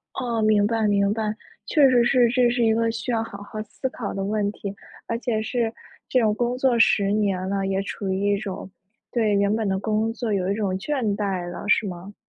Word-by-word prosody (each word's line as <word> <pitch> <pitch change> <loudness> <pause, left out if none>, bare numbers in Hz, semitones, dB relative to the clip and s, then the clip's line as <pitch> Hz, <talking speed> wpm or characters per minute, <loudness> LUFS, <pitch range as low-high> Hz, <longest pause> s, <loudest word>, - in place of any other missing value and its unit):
哦， 235 -3 -1
明 215 -1 +4
白 220 -1 +1
明 200 0 +2
白。 215 -1 -2 0.3
确 285 -4 +5
实 245 -2 +4
是， 245 -2 +4
这 245 0 +3
是 240 0 +1
一 225 -1 +4
个 230 0 +1
需 230 +2 -4
要 225 -1 +1
好 200 -2 -9
好 215 +1 -6
思 260 +5 -5
考 225 -5 -5
的 195 - -3
问 205 0 0
题。 200 -1 -6 0.3
而 230 - -1
且 230 -3 -1
是 230 0 -1 0.3
这 255 - +2
种 215 -1 +3
工 240 +2 -1
作 255 -3 +2
10 200 -3 +4
年 195 -3 0
了， 195 -1 -1
也 195 0 0
处 200 0 -5
于 200 +2 +1
一 - - +1
种 195 -2 -6 0.4
对 220 -4 +2
原 200 +1 +2
本 220 -2 0
的 190 0 0
工 220 +2 0
作 230 -2 -3
有 190 -1 0
一 - - +2
种 205 -3 -1
倦 225 -3 -1
怠 190 -4 -2
了 175 - -7
是 215 - +3
吗？ 185 +2 -7
215 Hz, 240 characters per minute, -24 LUFS, 200-230 Hz, 0.4 s, 确